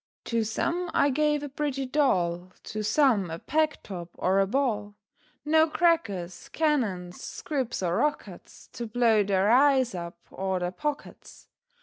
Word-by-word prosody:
To 230 -1 0
some 340 +11 -2
I 285 - +4
gave 295 +1 +1
a - - -3
pretty 275 -1 -2
doll, 180 - 0
To 215 - -5
some 210 - +3
a 165 - -5
peg 310 - 0
top, 175 -3 -7
or 190 +2 +2
a 195 - +3
ball; 210 -4 -1 0.5
No 315 +1 +4
crackers, 205 - 0
cannons, 215 - -1
squibs, 260 -9 -4
or 175 0 0
rockets, 300 0 -3
To 235 - -5
blow 225 -1 +3
their 195 +1 +2
eyes 265 -1 +4
up, 170 -1 -6
or 190 -1 -2
their 180 0 -2
pockets. 295 +8 -6
230 Hz, 145 wpm, -27 LUFS, 190-290 Hz, 0.5 s, I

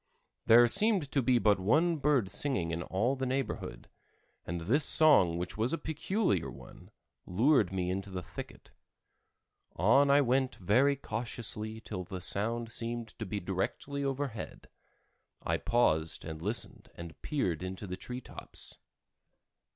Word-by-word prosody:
There 120 +2 +8
seemed 195 - +3
to 140 - +2
be 125 0 +3
but 105 -4 +3
one 155 - +2
bird 140 -7 +2
singing 100 - -1
in 85 +1 -2
all 110 +9 0
the 130 -1 -2
neighborhood, 135 +1 -3 0.6
and 85 +1 -3
this 125 - +2
song 140 - +5
which 90 +3 -5
was 115 +6 +1
a - - +1
peculiar 160 - -1
one, - - -13 0.4
lured 110 - +3
me 90 -1 -1
into 95 +1 -4
the 90 -1 -5
thicket. - - -10 1.0
On 135 - +4
I 140 +1 +6
went 130 0 +1
very 125 +10 +3
cautiously 110 -3 -4
till 95 -5 -5
the 95 0 -7
sound 115 +5 -2
seemed 115 0 -4
to 110 - -4
be 100 +2 -3
directly 120 +10 -3
overhead. 135 -4 -4 0.7
I - - 0
paused 80 -10 +1
and 80 -1 -6
listened 110 +6 -5
and 85 -1 -10
peered 95 - -1
into 95 +2 -5
the 90 -1 -5
tree 125 +7 -7
tops. - - -6
115 Hz, 145 wpm, -31 LUFS, 95-135 Hz, 1.0 s, There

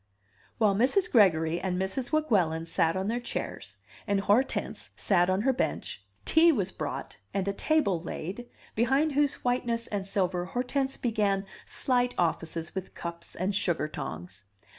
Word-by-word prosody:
While 210 -3 +4
Mrs. 265 - +3
Gregory 170 -7 +4
and 180 0 -2
Mrs. 195 +7 -2
Weguelin 190 - +2
sat 165 0 +1
on 190 - -1
their 230 +4 0
chairs, 245 - -5 0.3
and 200 -1 +2
Hortense 210 +7 0
sat 175 -2 +2
on 185 +2 +2
her 265 +4 +3
bench, 255 - -2 0.2
tea 330 +1 +6
was 205 - 0
brought - - -5 0.2
and 195 -1 0
a 200 - +1
table 200 - +1
laid, 190 +8 -6 0.2
behind 270 +7 +2
whose 290 0 +2
whiteness 240 -2 0
and 200 -2 -4
silver 180 -3 0
Hortense 265 +5 -1
began 205 -4 0 0.2
slight 245 -1 0
offices 165 -1 -1
with 190 -1 -6
cups 170 0 -6
and 190 +3 -1
sugar 175 -6 +1
tongs. 95 - -6
200 Hz, 150 wpm, -29 LUFS, 175-245 Hz, 0.3 s, tea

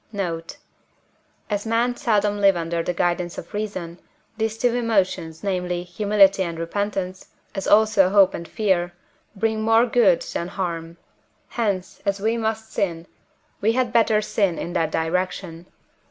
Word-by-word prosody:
Note. 170 -5 -4 0.9
As 205 -1 -2
men 230 +2 +1
seldom 210 -3 +1
live 195 -1 +5
under 170 0 -2
the 170 - -1
guidance 175 0 -1
of 170 - -9
reason, 185 -5 -4 0.4
these 220 0 -2
two 240 +1 +1
emotions, 190 -8 0
namely, 180 -3 -1
Humility 195 +1 +3
and 170 -3 -2
Repentance, 185 +2 -3 0.3
as 195 -1 -4
also 210 -3 +5
Hope 195 -1 +5
and 170 - -6
Fear, 185 -5 0 0.4
bring 220 +2 0
more 225 +2 +4
good 225 -7 +3
than 170 - -4
harm; 170 -3 -4 0.5
hence, 195 -6 -2
as 200 0 -1
we 220 +3 +1
must 220 -1 -3
sin, 170 -3 -1 0.6
we 220 +3 +3
had 250 -1 0
better 220 -2 +3
sin 195 -5 0
in 175 - -5
that 165 -3 +1
direction. 175 +1 -2
195 Hz, 145 wpm, -23 LUFS, 175-220 Hz, 0.9 s, live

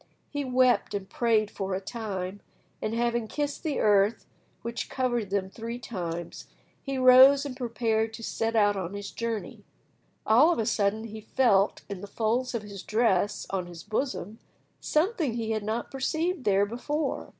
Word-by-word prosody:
He 290 -1 -2
wept 255 -4 +2
and 195 -1 -4
prayed 220 -2 +1
for 190 -1 -3
a - - -1
time, 200 -3 -5 0.4
and 215 +1 -2
having 235 -1 0
kissed 290 +3 -3
the 310 -4 -2
earth 205 +1 +3 0.4
which 235 0 -4
covered 240 -5 -1
them 195 -1 0
three 230 +2 -5
times, 175 -8 -6 0.3
he 275 -1 -3
rose 260 +2 +7
and 270 -3 -5
prepared 225 -3 0
to 230 - -10
set 225 +1 -2
out 205 -2 +4
on 190 0 -4
his 200 0 -6
journey. 230 -2 -4 0.6
All 255 +10 +6
of - - 0
a 225 - 0
sudden 210 +1 +1
he 220 -1 -8
felt, 210 -4 +2
in 195 -2 -6
the 205 - -7
folds 235 +5 -1
of 225 - -2
his 200 -2 -8
dress 210 -2 +1
on 185 -2 -2
his 170 -1 -10
bosom, 220 -1 -3 0.4
something 315 - 0
he 225 -1 -2
had 215 -1 0
not 220 +3 -3
perceived 315 +4 -1
there 200 0 +4
before. 275 +7 -3
225 Hz, 170 wpm, -28 LUFS, 205-255 Hz, 0.6 s, rose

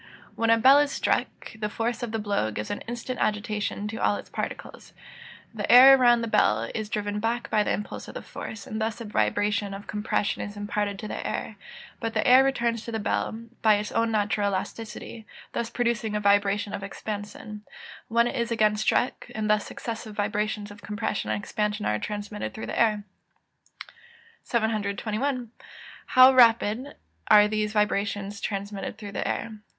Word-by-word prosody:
_ - - -23 0.3
When 230 0 0
a 230 - +6
bell 265 +5 +7
is 290 -1 +2
struck, - - -2
the 210 -1 -2
force 230 +3 -2
of 240 -2 -3
the 225 - -1
blow 205 - -1
gives 105 0 -5
an 205 - -4
instant 240 +2 -5
agitation 210 -1 -1
to 220 - -5
all - - +2
its - - -9
particles. - - -6 0.6
The - - -2
air 265 +2 +10
around 240 -2 +4
the 230 - -2
bell 115 - +2
is 220 -2 -4
driven 205 0 -2
back 230 +2 -2
by 215 - +3
the - - 0
impulse 210 - -4
of - - -10
the - - -6
force, 215 -2 -8
and 220 +1 -5
thus 220 +1 -2
a 230 - -6
vibration 205 -1 0
of 200 - -9
compression 210 0 -1
is 205 0 -6
imparted 205 -1 -2
to 215 - -6
the - - -5
air; 220 - -4 0.4
but 225 -1 -3
the - - +1
air 255 +2 +8
returns 235 -4 0
to 235 - -5
the 225 - -2
bell, 220 +1 -2 0.2
by 215 -1 +5
its 210 +1 -3
own 230 0 +1
natural 210 -1 +1
elasticity, 215 +3 -6 0.3
thus 230 - -2
producing 235 -3 -1
a - - +1
vibration 205 0 +2
of - - -4
expansion 205 +1 -6 0.5
when 235 +1 +3
it 240 - -2
is 235 -2 -1
again 215 -2 +2
struck, 245 +3 0
and 215 -1 0
thus 210 -1 +1
successive 225 -2 -6
vibrations 210 0 -2
of 205 - -13
compression 210 0 -3
and - - 0
expansion 210 0 -2
are 105 - 0
transmitted 210 - -5
through 220 - -5
the - - -4
air. 215 -3 +2 1.4
721. 220 +3 -1 0.6
_How 255 +1 +9
rapidly 235 +1 +4 0.3
are 210 0 +7
these 215 0 -1
vibrations 205 -1 -1
transmitted 200 0 -4
through 205 -2 -8
the - - -3
air? 230 - -2
215 Hz, 180 wpm, -26 LUFS, 205-230 Hz, 1.4 s, air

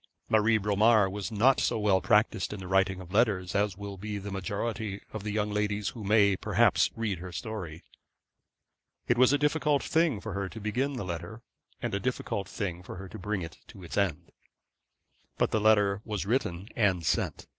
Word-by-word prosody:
Marie 110 +1 +4
Bromar 105 +1 +4
was 100 +3 -5
not 120 +5 +4
so - - +1
well 100 -3 +2
practised 105 -1 +2
in 105 - -6
the 95 - -7
writing 95 0 +2
of 90 -1 -11
letters 100 -5 +2
as 100 -2 0
will 100 -1 -7
be 105 +2 -5
the 100 0 -6
majority 100 +2 -3
of 110 - -4
the 105 +1 -4
young 105 0 -1
ladies 105 0 -1
who 115 - -9
may, 100 -1 +4
perhaps, - - +3
read 105 -6 -2
her 90 - -7
history. 90 -3 -6 1.2
It 120 - +2
was 130 0 +6
a 145 - +4
difficult 150 0 +1
thing 160 -9 +2
for 110 0 -6
her 100 -1 -3
to 110 - -9
begin 125 +7 -1
the 125 -7 -4
letter, 85 +6 -6 0.4
and - - -2
a - - 0
difficult 100 -1 -3
thing 90 -4 -4
for 90 - -9
her 95 +1 -8
to - - -9
bring 100 -1 -2
it 80 -2 -9
to 95 - -13
its 85 - -7
end. 95 -7 -1 1.1
But - - +1
the 110 - +1
letter 105 -2 +4
was 105 -4 -3
written 100 -4 -1
and 95 -7 +2
sent. - - -1
105 Hz, 195 wpm, -29 LUFS, 95-110 Hz, 1.2 s, was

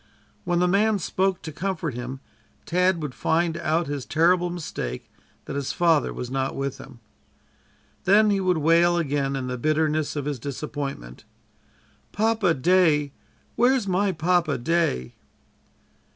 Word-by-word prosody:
When 175 -1 +1
the 180 +1 +3
man 205 +3 +3
spoke 190 +1 -1
to 160 - -6
comfort 165 -2 -3
him, 125 +2 -6 0.4
Tad 180 -1 +1
would 145 -4 -4
find 165 +3 0
out 165 0 0
his 145 -2 -4
terrible 175 +4 +2
mistake, 150 - -6 0.3
that - - -6
his 140 -2 -2
father 165 -6 +2
was 125 0 -6
not 135 0 -2
with 135 0 -3
him. 135 -3 -12 1.1
Then 210 +3 +5
he 200 - +1
would 180 -2 +1
wail 170 +3 +4
again 140 -4 -1
in 135 -1 -3
the 125 -1 -4
bitterness 155 +1 0
of 145 -2 -3
his 145 -3 -3
disappointment: 140 - -6 0.9
"Papa 215 -5 +2
day, 150 -2 +3 0.4
where's 245 -2 +2
my 195 +2 +1
Papa 170 -2 +1
day?" 120 - 0
160 Hz, 140 wpm, -24 LUFS, 140-180 Hz, 1.1 s, Then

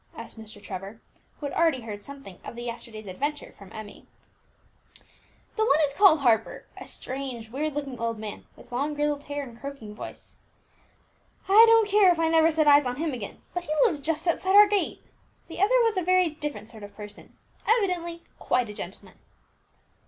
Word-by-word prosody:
asked 230 0 -9
Mr. 215 -1 -11
Trevor, 195 +2 -8 0.4
who 295 - -6
had 285 - -4
already 325 -6 +2
heard 210 -3 -7
something 275 -8 -11
of - - -8
the 240 - -7
yesterday's 230 -2 -7
adventure 285 +10 -4
from 200 -1 -14
Emmie. 215 -2 -10 1.5
"The 440 - +1
one 300 -9 +4
is 275 - -8
called 335 -3 +6
Harper, 225 -4 +1
a - - -9
strange, 255 -4 -6
weird 295 +3 -2
looking 275 -4 -4
old 230 -1 -2
man, 215 -1 -7
with - - -17
long 285 +5 -1
grizzled 295 -1 -1
hair, 290 0 -4
and 235 -3 -11
croaking 275 -7 -7
voice," - - -10 1.1
replied 390 - -2
Vibert. 430 - +10
"I - - +10
don't 455 -2 +6
care 405 -2 +5
if 345 - 0
I 325 -1 +2
never 325 0 +5
set 310 -1 +2
eyes 285 -2 +6
on 250 - -2
him 310 +1 -2
again, 225 -5 -7
but 355 -1 -3
he 305 - -2
lives 325 -11 0
just 315 +3 -2
outside 375 +3 +1
our 415 0 +10
gate. 410 -1 -1 0.4
The 335 - -9
other - - +4
was 450 -3 +1
a - - +2
very 365 0 +3
different 295 -6 -6
sort 225 -2 -10
of 205 0 -11
person, 210 -1 -11 0.3
evidently 360 -7 +1 0.2
quite 245 -3 0
a - - -6
gentleman." 190 -1 -9
285 Hz, 195 wpm, -26 LUFS, 230-335 Hz, 1.5 s, Vibert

